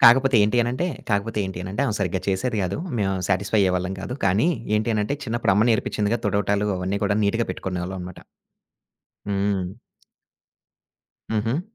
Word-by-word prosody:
కాకపోతే 130 +2 +7
ఏంటి 105 +3 +2
అనంటే, 125 +9 -1 0.2
కాకపోతే 105 +2 0
ఏంటి 95 -2 -5
అనంటే 95 +8 -2
ఆమె 110 - -1
సరిగ్గా 95 -2 -1
చేసేది 100 +5 0
కాదు. 95 +1 -1 0.2
మేము 95 -2 +1 0.2
సాటిస్ఫై 100 +3 +1
అయ్యేవాళ్ళం 90 -1 +1
కాదు. 120 +6 -4
కానీ 100 - +3 0.3
ఏంటి 110 +2 0
అనంటే 105 +6 0
చిన్నప్పుడు 115 -3 +1
అమ్మ 105 +4 +4
నేర్పించిందిగా 110 0 +1
తుడవటాలు, 100 0 +1
అవన్నీ 95 +2 -1
కూడా 100 0 +1
నీట్‌గా 115 +3 +1
పెట్టుకునేవాళ్ళం 90 0 -4
అనమాట. 90 0 -8 1.1
హ్మ్. 100 -1 0 1.7
హుహు. 115 +7 0
100 Hz, 145 wpm, -24 LUFS, 95-115 Hz, 1.7 s, కాకపోతే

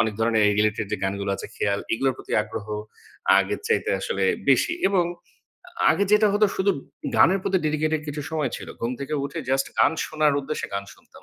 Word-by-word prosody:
অনেক 110 -2 +1
ধরনের 115 -1 +3 0.2
রিলেটেড 105 0 +1
যে - - +1
গানগুলো 100 +1 -2
আছে - - -7
খেয়াল 100 0 0
এগুলোর 130 +3 +1
প্রতি - - -9
আগ্রহ 110 0 -7 0.7
আগের - - 0
চাইতে 460 - +1
আসলে 470 - -1 0.2
বেশি - - +4 0.2
এবং 190 -3 +2 0.9
আগে 200 - +2
যেটা 210 0 +6
হতো 210 +1 +4
শুধু 195 +1 +2 0.5
গানের 190 +2 +5
প্রতি 190 - +1
ডেডিকেটেড 155 +1 0
কিছু 150 0 -4
সময় 155 -5 -1
ছিল। - - -9
ঘুম 120 +2 -1
থেকে 140 +2 -3
উঠে 155 - -5
জাস্ট 135 0 +2
গান - - +5
শোনার 150 -2 +2
উদ্দেশ্যে 150 +3 -4
গান 100 0 -2
শুনতাম। - - -19
145 Hz, 180 wpm, -24 LUFS, 110-175 Hz, 0.9 s, যেটা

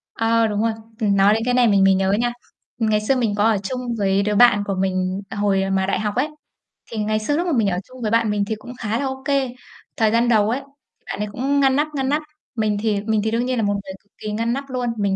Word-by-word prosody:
Ờ, 225 0 +2
đúng 210 0 -1
rồi. 230 - +2 0.3
Ừm, 205 -3 +2
nói 200 +2 +5
đến 225 - 0
cái 250 - +1
này 245 -1 +4
mình 200 -2 +4
mới 195 0 +6
nhớ 190 0 +1
nha, 240 +4 +1 0.5
ngày 215 -2 +1
xưa 265 +5 +1
mình 225 -5 0
có 205 - +1
ở 220 -2 +3
chung 250 +4 -3 0.2
với 195 0 +1
đứa 210 0 0
bạn 205 -3 +5
của 195 - -1
mình 185 0 -1
hồi 195 -1 0
mà 190 0 +1
đại 195 - 0
học 210 0 -2
ấy. 265 +5 +1 0.6
Thì 225 - -5
ngày 215 0 0
xưa 290 +8 -1
lúc 350 +1 -1
mà 330 - +1
mình 215 -3 +2
ở 180 - -1
chung 255 -1 -13
với 215 - -1
bạn 230 -1 +2
mình 205 -1 0
thì 220 +1 -2
cũng 245 +3 -10
khá 220 +1 -1
là 280 - -1
ô 265 0 -4
kê. 275 -3 +1 0.5
Thời 220 -2 +3
gian 235 +1 +2
đầu 215 -2 +3
ấy, 250 +4 0 0.4
thì - - -43
bạn - - -5
ấy 210 - -1
cũng 275 +5 0
ngăn 270 -1 +4
nắp, 295 +2 +2
ngăn 265 -1 -1
nắp. 300 +2 +1 0.3
Mình 215 -2 0
thì 210 -3 0
mình 215 0 0
thì 220 - 0
đương 235 +2 0
nhiên 255 -1 -1
là 225 - +1
một 205 0 +1
người 195 -1 -5
cực 205 - -39
kỳ 215 - -5
ngăn 230 +2 -1
nắp 275 +1 -5
luôn. 250 -1 -2
Mình 200 -2 0
220 Hz, 285 wpm, -21 LUFS, 205-245 Hz, 0.6 s, mới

